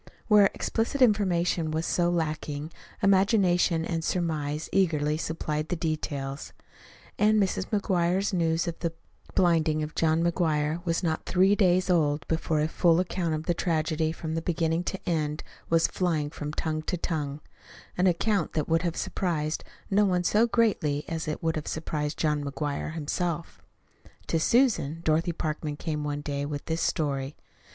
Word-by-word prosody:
Where 210 -3 +6
explicit 235 +5 -1
information 180 -8 +2
was 160 +1 -1
so 175 -1 +1
lacking, 155 -2 -2 0.3
imagination 190 -4 +3
and 165 -2 -2
surmise 155 -4 -1
eagerly 155 -6 +2
supplied 155 -1 -3
the - - 0
details; 145 -4 -3 0.7
and 215 +1 +4
Mrs. 190 -1 0
McGuire's 190 -2 +1
news 165 -1 +1
of 170 - -4
the 165 -1 -2 0.4
blinding 160 -3 +3
of 150 - -5
John 160 0 +2
McGuire 160 -1 0
was 165 +2 0
not 160 -2 -1
three 190 +2 +4
days 185 -3 +3
old 155 -5 +1
before 160 -1 0
a 155 - +2
full 170 0 +3
account 175 -3 -1
of 155 - -4
the 175 - +1
tragedy 160 -2 0
from 160 -1 -5
beginning 165 0 0
to 195 - -3
end 155 -3 -1 0.3
was 165 0 +4
flying 160 -5 0
from 150 -1 -5
tongue 155 0 -2
to 180 +3 -2
tongue 150 -4 -3 0.6
an 180 +1 +3
account 185 0 +1
that 155 -2 -1
would 165 0 +2
have 170 -2 -2
surprised 155 -4 -2 0.3
no 205 +2 +4
one 180 -3 +2
so 215 +6 +3
greatly 185 -12 +1
as 165 -1 -4
it 155 - -4
would 160 0 +1
have 155 - -4
surprised 150 -1 -3
John 150 -2 0
McGuire 145 +2 -3
himself. 165 +2 -3 0.6
To 165 - 0
Susan, 185 - +2
Dorothy 165 +2 +2
Parkman 155 -2 -3
came 150 -2 -3
one 145 0 -3
day 140 -1 -3
with 145 0 -4
this 160 +1 -2
story. 140 -3 -1
165 Hz, 160 wpm, -27 LUFS, 155-180 Hz, 0.7 s, Where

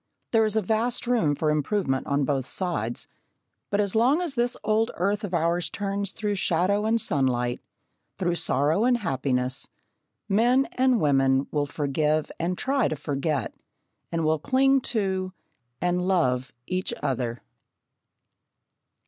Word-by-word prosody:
There 225 -1 +4
is 215 0 -1
a 220 - +2
vast 225 +5 0
room 225 -12 +2
for 155 +1 +1
improvement 150 -2 0
on 140 0 +1
both 135 -2 -1
sides, 145 - -2 0.6
but 200 - 0
as 200 -2 0
long 250 +8 +3
as 350 -5 -1
this 240 -1 0
old 220 +1 +2
earth 200 +4 0
of 200 - -4
ours 170 0 0
turns 200 -1 -2
through 210 -1 -2
shadow 190 +2 +1
and 230 +1 +2
sunlight, 125 - 0 0.6
through 175 -2 0
sorrow 160 +3 +1
and 245 0 +3
happiness, 130 - -1 0.6
men 240 +6 +3
and 255 -2 +2
women 135 -3 +3
will 145 -1 0
forgive 150 +2 0
and 175 +2 -1
try 270 -3 +1
to - - -2
forget, 145 0 -2 0.6
and 165 -1 -1
will 155 0 +2
cling 270 - +3
to, 190 -4 -1 0.5
and 180 0 0
love 130 -9 +1
each 185 +5 -2
other. 120 -2 -2
180 Hz, 140 wpm, -26 LUFS, 145-220 Hz, 0.6 s, There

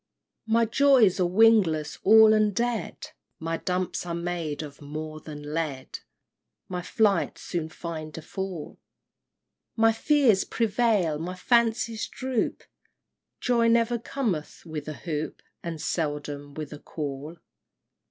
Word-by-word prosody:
V. 220 - -1
My 230 0 +5
joys 245 -5 +4
are 180 - +3
wingless 185 -7 +3
all 220 +1 +8
and 215 -2 +2
dead; 235 -5 -2 0.3
My 165 0 -3
dumps 180 +1 -2
are 170 -1 -4
made 170 -3 -3
of 145 0 -10
more 155 +1 -6
than 150 -1 -8
lead; 150 -5 -3 0.7
My 180 -1 -4
flights 205 +2 +1
soon 165 -3 -3
find 160 -2 -7
a 160 - -7
fall; 190 -4 -6 1.0
My 225 0 +5
fears 235 -4 +3
prevail, 215 -8 +1
my 180 +3 -4
fancies 230 +2 +1
droop, 255 -3 -2 0.8
Joy 235 -2 +3
never 230 +1 +3
cometh 220 - -3
with 155 -3 -6
a 155 - -3
hoop, 155 -1 -5 0.2
And 165 -2 -5
seldom 145 -3 -3
with 155 -1 -6
a 150 - -9
call! 150 +2 -6
175 Hz, 130 wpm, -26 LUFS, 155-225 Hz, 1.0 s, all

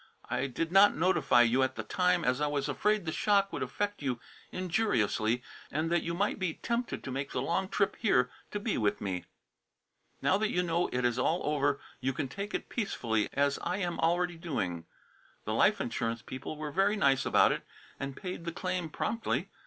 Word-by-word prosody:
I - - 0
did 165 +6 -3
not 195 +2 +7
notify 150 -7 +4
you 120 +3 +3
at 130 0 +1
the - - -4
time 180 -2 +1
as 125 +3 +1
I 150 - +2
was 145 -2 -1
afraid 210 -3 +1
the 160 - -1
shock 200 +2 +2
would - - -3
affect 205 -2 -2
you 130 -4 -1 0.3
injuriously 125 - +1 0.3
and 155 +3 -1
that 170 -1 +3
you 170 0 -3
might 205 +3 0
be 185 -4 -1
tempted 235 +1 -2
to 130 - -5
make 135 +1 -3
the - - 0
long 185 +5 0
trip 200 -1 +1
here 125 - +2 0.2
to 205 - -3
be 210 - -1
with 105 -2 +1
me. 95 -3 -3 0.9
Now 190 - +2
that 215 0 +1
you 180 - +1
know 170 0 +1
it 125 0 0
is 120 0 +1
all 160 +7 +1
over, 145 -1 +1 0.2
you 130 +1 -1
can 140 +1 -2
take 200 +7 -4
it - - -3
peacefully, 115 - -1
as 140 0 +1
I 180 - -2
am 175 -3 -2
already 175 +1 +1
doing. 90 - -3 0.6
The - - -1
life - - +4
insurance 115 0 -2
people 130 +4 -6
were 150 -1 -4
very 195 +5 +2
nice 140 -10 +3
about - - +5
it - - -1 0.4
and 135 0 -5
paid 180 -3 -5
the 170 - -2
claim 180 -1 -2
promptly. 230 +8 -2
165 Hz, 200 wpm, -31 LUFS, 130-190 Hz, 0.9 s, not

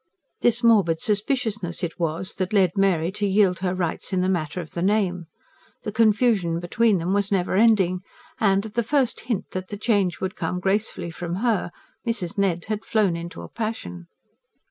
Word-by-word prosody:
This 240 +1 +2
morbid 200 -9 +4
suspiciousness 210 -4 -1
it 170 0 -3
was 165 +2 -2
that 185 +1 -2
led 190 -4 +4
Mary 185 -4 +2
to 205 +1 -1
yield 190 -2 +3
her 185 0 -1
rights 175 0 -3
in 185 -1 +1
the 185 - +1
matter 170 -2 -1
of 160 -3 -7
the 170 - -4
name: 185 -3 +1 0.6
the 215 - -3
confusion 215 -6 +2
between 205 +4 +2
them 175 +3 -1
was 200 0 0
never 185 -3 +1
ending; 195 -4 +4 0.4
and, 200 -3 +2
at 215 - -8
the 235 - +1
first 255 +1 +1
hint 225 -5 -3
that 185 0 -4
the 205 - -6
change 200 -5 +1
would 190 0 -3
come 180 - -2
gracefully 195 -2 -1
from 175 +1 -4
her, 225 -7 +1 0.3
Mrs. 225 -5 -2
Ned 190 -4 0
had 215 0 -3
flown 210 -6 +1
into 170 +1 -7
a - - -8
passion. 90 - -5
195 Hz, 185 wpm, -24 LUFS, 175-215 Hz, 0.6 s, morbid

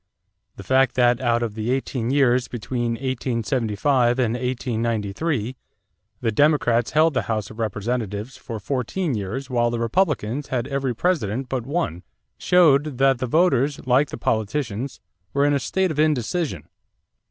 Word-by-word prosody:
The - - -9
fact 130 -1 +2
that, 120 0 +3
out 120 -1 +1
of 115 -3 -3
the 110 +2 -3
eighteen 130 -2 -1
years 130 -3 +3
between 120 0 -3
1875 120 0 0
and 120 -3 +1
1893, 120 +1 -2 0.7
the 115 - +1
Democrats 120 -3 +2
held 155 +1 +4
the 125 - +1
House 110 -2 -2
of 110 - -12
Representatives 110 +1 -3
for 115 -2 -7
fourteen 140 - -2
years 110 +6 -4
while 120 -1 +2
the 120 - -2
Republicans 135 - 0
had 125 -3 -2
every 135 -3 -2
President 130 - -1
but 125 -2 -3
one 140 - -2 0.4
showed 150 -6 +4
that 135 -1 +3
the 130 - -2
voters, 145 -2 +2
like 130 +3 +3
the - - -6
politicians, 115 +2 -2 0.4
were 140 0 +3
in 145 - +3
a 140 - +2
state 190 +5 0
of 150 - -4
indecision. 150 - 0
125 Hz, 150 wpm, -23 LUFS, 115-140 Hz, 0.7 s, held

